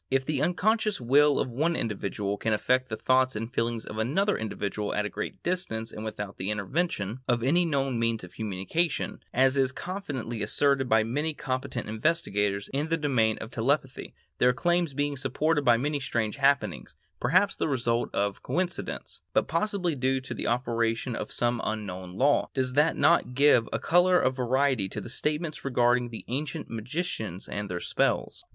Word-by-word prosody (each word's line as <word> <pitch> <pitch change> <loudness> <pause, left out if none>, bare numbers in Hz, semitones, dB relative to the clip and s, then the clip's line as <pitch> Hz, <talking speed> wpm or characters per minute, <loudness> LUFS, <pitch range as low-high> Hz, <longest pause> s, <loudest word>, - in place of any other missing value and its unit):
If 135 0 +1
the 145 -2 -1
unconscious 215 +4 +1
will 140 +4 +4
of 130 - -1
one 160 +8 +1
individual 100 -3 -2
can 110 +1 -1
affect 130 +4 +1
the 110 - -3
thoughts 130 +2 +2
and 115 +3 -4
feelings 115 -1 -1
of 110 - -6
another 190 - +1
individual 105 -1 -3
at 105 - 0
a - - -2
great 105 - -6
distance 115 -12 -2
and 110 - -7
without 105 -2 -5
the 95 - -3
intervention 105 - -1
of 120 -2 +1
any 170 +7 +3
known 135 -6 0
means 115 -2 0
of 90 - -11
communication, 110 - -2
as 130 +2 +3
is 135 -1 +3
confidently 135 - -5
asserted 130 +4 +2
by 110 0 +5
many 145 +7 -1
competent 130 -2 -3
investigators 105 - 0
in 145 +3 -1
the 165 - +2
domain 125 -8 +2
of 110 - -8
telepathy, 130 +3 -1 0.2
their 125 0 +5
claims 175 -1 +1
being 145 0 0
supported 145 +4 0
by 120 -3 +5
many 145 +4 -1
strange 115 -5 -2
happenings, 135 - +1 0.2
perhaps 185 +11 +3
the - - -1
result 120 -4 0
of 100 -1 -1
coincidence, 180 0 -3
but - - +2
possibly 180 +1 0
due 130 -1 +1
to 130 - -6
the - - -3
operation 115 0 0
of - - -5
some 120 -1 0
unknown 95 -4 -4
law, 140 +2 +3
does 130 -1 0
this 150 +4 +3
not 170 -7 +3
give 140 -4 +5
a - - 0
color 180 +1 +4
of 130 +1 +1
verity 130 -4 +1
to - - -5
the - - -8
statements 150 +5 -2
regarding 125 -2 +2
the 115 - -8
ancient 135 +2 -4
magicians 110 - -4
and 105 0 -4
their 90 -1 -3
spells? - - 0
130 Hz, 175 wpm, -28 LUFS, 110-150 Hz, 0.2 s, by